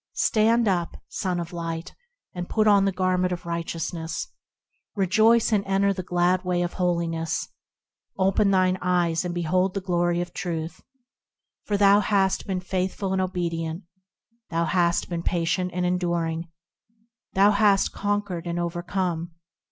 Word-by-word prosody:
Stand 230 Hz, +1 st, +3 dB
up, 175 Hz, -3 st, 0 dB
Son 180 Hz, -2 st, -2 dB
of 170 Hz, +1 st, -6 dB
Light 165 Hz, 0 st, -4 dB
I 485 Hz, -, -16 dB
and 175 Hz, -, -5 dB
put 215 Hz, -1 st, +2 dB
on 200 Hz, -2 st, +5 dB
the 195 Hz, -, +2 dB
garment 185 Hz, -1 st, 0 dB
of 175 Hz, -1 st, -4 dB
righteousness; 170 Hz, 0 st, -4 dB, 0.7 s
Rejoice! 220 Hz, +4 st, +3 dB
and 200 Hz, -2 st, +2 dB
enter 195 Hz, +1 st, +2 dB
the 185 Hz, -, -4 dB
glad 180 Hz, +1 st, +1 dB
way 180 Hz, -1 st, 0 dB
of 175 Hz, -, -3 dB
holiness; 170 Hz, -3 st, -1 dB, 0.7 s
Open 195 Hz, +1 st, +3 dB
thine 185 Hz, -1 st, +2 dB
eyes, 175 Hz, -2 st, +1 dB
and 175 Hz, -1 st, -4 dB
behold 180 Hz, +3 st, +1 dB
the -, -, 0 dB
glory 175 Hz, -2 st, 0 dB
of 175 Hz, 0 st, -4 dB
Truth; 165 Hz, -4 st, -4 dB, 0.8 s
For 205 Hz, -, 0 dB
thou 200 Hz, 0 st, +6 dB
hast 195 Hz, -2 st, +1 dB
been 185 Hz, -2 st, -2 dB
faithful 190 Hz, +1 st, -2 dB
and 190 Hz, -, +1 dB
obedient; 170 Hz, -2 st, -3 dB, 0.7 s
Thou 170 Hz, 0 st, 0 dB
hast 170 Hz, 0 st, +1 dB
been 170 Hz, -1 st, -3 dB
patient 175 Hz, +1 st, 0 dB
and 180 Hz, +1 st, -1 dB
enduring; 170 Hz, -2 st, -1 dB, 0.9 s
Thou 200 Hz, +2 st, +5 dB
hast 200 Hz, -1 st, +3 dB
conquered 205 Hz, -4 st, -2 dB
and 170 Hz, 0 st, -2 dB
overcome. 175 Hz, -1 st, -2 dB
180 Hz, 145 wpm, -25 LUFS, 170-195 Hz, 0.9 s, thou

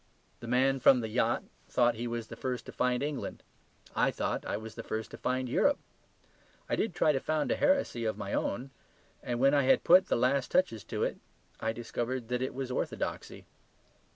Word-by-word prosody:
The 120 Hz, -, -8 dB
man 135 Hz, +3 st, +3 dB
from 125 Hz, 0 st, +6 dB
the 110 Hz, -, -4 dB
yacht -, -, +1 dB, 0.3 s
thought 120 Hz, -1 st, +3 dB
he 115 Hz, +2 st, -4 dB
was 115 Hz, -1 st, -3 dB
the 115 Hz, -, -9 dB
first 125 Hz, +1 st, -3 dB
to -, -, -8 dB
find 125 Hz, +1 st, 0 dB
England; 145 Hz, -2 st, -4 dB, 0.5 s
I -, -, +3 dB
thought -, -, -2 dB
I -, -, -1 dB
was 110 Hz, 0 st, -8 dB
the 115 Hz, -, -6 dB
first 110 Hz, 0 st, -4 dB
to -, -, -8 dB
find 130 Hz, 0 st, -1 dB
Europe. 280 Hz, -, +3 dB, 0.9 s
I -, -, 0 dB
did 215 Hz, -6 st, -1 dB
try 155 Hz, -, +4 dB
to 135 Hz, -, 0 dB
found 155 Hz, +2 st, -1 dB
a -, -, +3 dB
heresy 275 Hz, -, +1 dB
of 110 Hz, -2 st, -1 dB
my 100 Hz, -1 st, -5 dB
own; 130 Hz, +6 st, -2 dB, 0.5 s
and 120 Hz, -1 st, -3 dB
when 135 Hz, +2 st, +5 dB
I 145 Hz, -, +5 dB
had 135 Hz, -, +4 dB
put 185 Hz, +2 st, +6 dB
the -, -, +2 dB
last 130 Hz, +2 st, +2 dB
touches 150 Hz, -, +1 dB
to -, -, -2 dB
it, -, -, -2 dB, 0.4 s
I 110 Hz, -, 0 dB
discovered 120 Hz, +1 st, -4 dB
that 125 Hz, 0 st, -1 dB
it 130 Hz, -, -3 dB
was 130 Hz, -1 st, -3 dB
orthodoxy. -, -, -3 dB
125 Hz, 205 wpm, -31 LUFS, 115-135 Hz, 0.9 s, from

